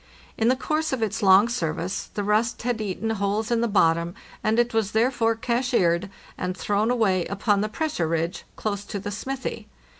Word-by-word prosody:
In 225 - +1
the 255 - +4
course 305 +4 -1
of 255 -4 -1
its 215 -1 -2
long 195 +2 +6
service 180 -4 -3
the 205 - -1
rust 215 +3 +1
had 240 -2 -1
eaten 215 +2 -2
holes 210 +2 -1
in 235 -1 +2
the 235 - +2
bottom, 170 -3 +2 0.3
and 215 +1 +2
it 240 0 +2
was 220 -2 0
therefore 230 0 +2
cashiered, 225 -7 +1 0.3
and 180 0 -2
thrown 205 +4 +1
away 200 -7 +2
upon 200 0 +1
the 215 - -1
pressure 295 - -1
ridge 165 +2 -2
close 205 -2 -3
to 205 - -5
the 205 +1 -5
smithy. 260 +6 -5
215 Hz, 185 wpm, -25 LUFS, 195-235 Hz, 0.3 s, long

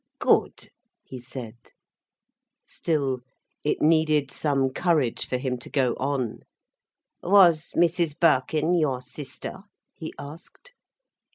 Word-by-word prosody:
"Good," - - +1 0.3
he 130 - -9
said. 120 -2 -9 1.1
Still 140 -6 -1 0.4
it 150 - 0
needed 155 -3 +3
some 135 -3 0
courage 155 -6 0
for 125 - 0
him 125 -1 -3
to - - -10
go 130 -3 +1
on. 130 -4 -2 0.8
"Was 175 -5 +5
Mrs 170 -2 +1
Birkin 155 +1 +2
your 145 -7 +1
sister?" 145 +7 -7 0.3
he 160 - -7
asked. 165 - -11
145 Hz, 105 wpm, -25 LUFS, 130-165 Hz, 1.1 s, Was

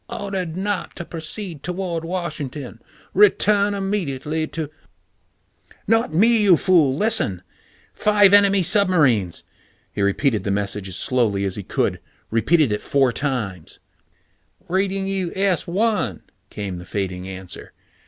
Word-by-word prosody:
"... - - -45
ordered 185 -4 -4
not 205 +2 -2
to 175 - -7
proceed 165 0 -5
toward 180 -2 -3
Washington. 150 -8 -5 0.3
Return 205 +1 +3
immediately 160 -6 -2
to 160 -2 -5 0.6
" - - -31
"Not 225 -7 0
me! 220 +7 +4
You 190 -5 +5
fool! 155 -8 +3
Listen! 185 - +2 0.5
Five 205 -2 +4
enemy 200 -1 +5
submarines 150 - +2 0.2
" - - -38
He - - -3
repeated 105 +4 +1
the - - -3
message 100 0 -2
as 90 - -5
slowly 110 -6 0
as 95 - -1
he 105 - -5
could, - - -1 0.3
repeated 140 +4 +2
it 105 - -1
four 135 -3 +1
times. 110 - -4 0.5
"... - - -40
reading 195 +2 0
you 195 -3 -2
S 195 -3 +1
1," 180 - 0 0.3
came 100 -4 -5
the 90 - -10
fading 95 -2 -4
answer. 95 -1 -8
160 Hz, 140 wpm, -21 LUFS, -, 0.6 s, You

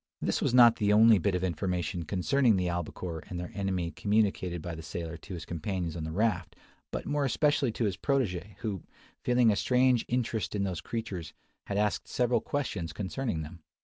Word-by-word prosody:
This - - -1
was - - +2
not 120 -2 +7
the 105 -1 +2
only 110 0 +7
bit 95 +1 +1
of 90 - -1
information 90 0 -2
concerning 115 - +2
the 90 -1 0
albacore 85 -1 -4
and 90 - -4
their 90 - -6
enemy 95 -4 -1
communicated 100 -4 0
by 85 +2 -5
the 80 - -7
sailor 80 +1 -5
to 90 +4 -8
his 85 - -7
companions 85 0 -3
on 80 -2 -4
the 80 - -4
raft, 90 -4 0 0.3
but - - -4
more 145 0 0
especially 145 -1 +2
to 115 - -1
his 100 -4 -1
protege, 105 - -1
who, 100 -6 -3 0.4
feeling 120 -2 +4
a - - +1
strange 125 +2 +3
interest 115 -4 -1
in 100 - 0
those 95 -4 -2
creatures, 100 -8 -5 0.3
had 100 - -2
asked 105 0 0
several 125 -1 +1
questions 100 - -3
concerning 100 -3 -3
them. 85 +3 -10
100 Hz, 190 wpm, -30 LUFS, 85-115 Hz, 0.4 s, not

